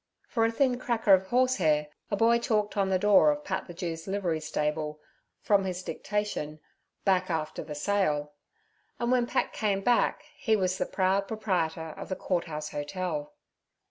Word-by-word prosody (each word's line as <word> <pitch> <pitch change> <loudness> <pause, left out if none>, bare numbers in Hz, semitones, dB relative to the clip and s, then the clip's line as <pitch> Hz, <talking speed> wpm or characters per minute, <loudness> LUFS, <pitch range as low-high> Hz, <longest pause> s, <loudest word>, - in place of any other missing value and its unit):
For 225 -2 +1
a 225 - +2
thin 250 +1 +1
cracker 230 -5 +3
of 190 0 +4
horsehair 185 -12 +2 0.2
a 205 - +1
schoolboy 230 +3 +4
chalked 215 -3 0
on 195 -2 +1
the 190 - +3
door 195 -5 +5
of 150 0 0
Pat 190 -1 -3
the 175 - -8
Jew's 165 -1 -5
livery 190 -5 -1
stable, 150 0 -2 0.4
from 200 -2 +3
his 185 -1 -3
dictation, 205 -9 -3 0.5
'Back 185 -2 +2
after 160 -2 -2
the 150 - -7
sail'; 150 -3 0 0.7
and 235 +1 0
when 245 -2 +3
Pat - - 0
came 200 -3 0
back 240 +4 +2
he 220 -2 +1
was 185 -2 0
the - - 0
proud 195 +1 +1
proprietor 175 -7 -1
of - - -7
the 185 - -1
Court 180 -2 -1
House 150 -2 -5
Hotel. 185 - -3
190 Hz, 175 wpm, -28 LUFS, 160-215 Hz, 0.7 s, door